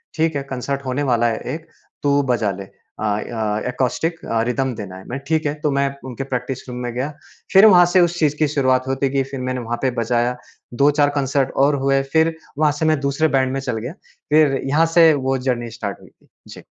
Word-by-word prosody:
ठीक 160 -1 +1
है।" 140 - -2
कंसर्ट 135 +1 -4
होने 130 +3 -1
वाला 120 -3 +2
है 115 -1 -1 0.2
एक 165 +1 -10 0.4
तू 145 0 +3
बजा 110 -4 +1
ले। 100 +1 -7 0.4
अ - - -4
अ, 105 0 -1
एकॉस्टिक 135 +7 -1
अ, 115 -1 0
रिदम 130 0 -1
देना 100 -3 -7
है। 95 - -11
मैं 130 - -4
ठीक 160 -1 0
है 145 - 0
तो 150 - +1
मैं 140 0 +1 0.2
उनके 130 0 -5
प्रैक्टिस 130 0 -4
रूम 125 - -6
में 120 -1 -3
गया। 130 +5 -3 0.4
फिर 195 +2 +8
वहाँ 180 -4 +8
से 185 - +6
उस 175 0 +1
चीज़ 150 -2 +2
की 155 - +3
शुरुआत 130 -3 +1
होती 135 0 0
गई। 135 0 +1
फिर 135 - -5
मैंने 130 0 -2
वहाँ 120 0 -3
पे 130 - +1
बजाया 120 +1 0 0.5
2-4 145 0 +4
कंसर्ट 135 -1 0
और 145 0 +2
हुए। 135 0 +3
फिर 160 0 +3 0.2
वहाँ 150 0 +3
से 160 - 0
मैं 155 -2 +2
दूसरे 140 +3 +1
बैंड 130 0 +1
में 135 - -1
चल 125 -4 -3
गया। 120 +7 -5 0.4
फिर 150 -3 +4
यहाँ 150 +5 +3
से 165 -2 +7
वो 135 -2 0
जर्नी 125 -2 -2
स्टार्ट 105 -3 -5
हुई - - -16
थी। - - -32 0.2
जी। - - -11
135 Hz, 225 wpm, -20 LUFS, 125-150 Hz, 0.5 s, फिर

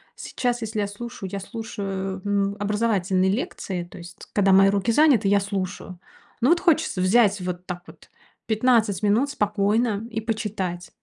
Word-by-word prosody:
Сейчас, 245 -1 -2
если 220 -1 -3
я 200 - -1
слушаю, 205 -1 -7
я 200 - -3
слушаю, 195 -3 -5
ну, 200 0 0
образовательные 200 -3 +1
лекции, 190 -5 -3
то 175 - -13
есть 175 +2 -12
когда 195 -2 +3
мои 195 +1 +6
руки 200 +3 +1
заняты, 265 -6 +4
я 200 +1 +4
слушаю. 190 -2 -5 0.4
Но 255 - +3
вот 345 - +4
хочется 320 - +1
взять 205 +1 +4
вот 180 0 -5
так 180 -1 -6
вот - - -16 0.4
15 220 -4 +2
минут 225 +8 +2
спокойно 210 -1 0
и 220 - -2
почитать. 205 -6 -3
205 Hz, 160 wpm, -24 LUFS, 190-225 Hz, 0.4 s, мои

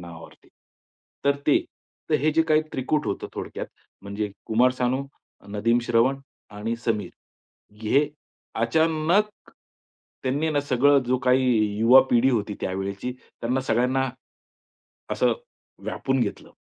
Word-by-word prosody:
नावावर. 85 -1 -11 0.9
तर 140 0 +3
ते 150 - +5 0.5
तर - - +3
हे 155 - +3
जे 160 +1 +4
काही 155 0 +5
त्रिकूट 145 +3 -1
होतं, 100 - -3
थोडक्यात - - -5 0.4
म्हणजे 100 +1 -4 0.2
कुमार 120 +3 +4
सानू, 130 +2 0 0.4
नदीम 110 +4 +1
श्रवण 120 +3 +2 0.3
आणि 110 +3 -3
समीर, 105 -6 0 0.7
हे 140 +7 +3 0.6
अचानक 160 - +2 0.9
त्यांनी 145 +5 0
ना, 145 -2 +1
सगळं 140 +1 +4
जो 130 - +2
काही 130 +1 +4 0.3
युवा 120 +4 +8
पिढी 120 +2 +4
होती 105 -4 -1
त्यावेळची, 100 +5 -3 0.3
त्यांना 125 +3 0
सगळ्यांना. 130 +2 +1 1.0
असं - - +2 0.5
व्यापून 135 -1 -1
घेतलं. 105 -4 -3
125 Hz, 120 wpm, -25 LUFS, 110-140 Hz, 1.0 s, युवा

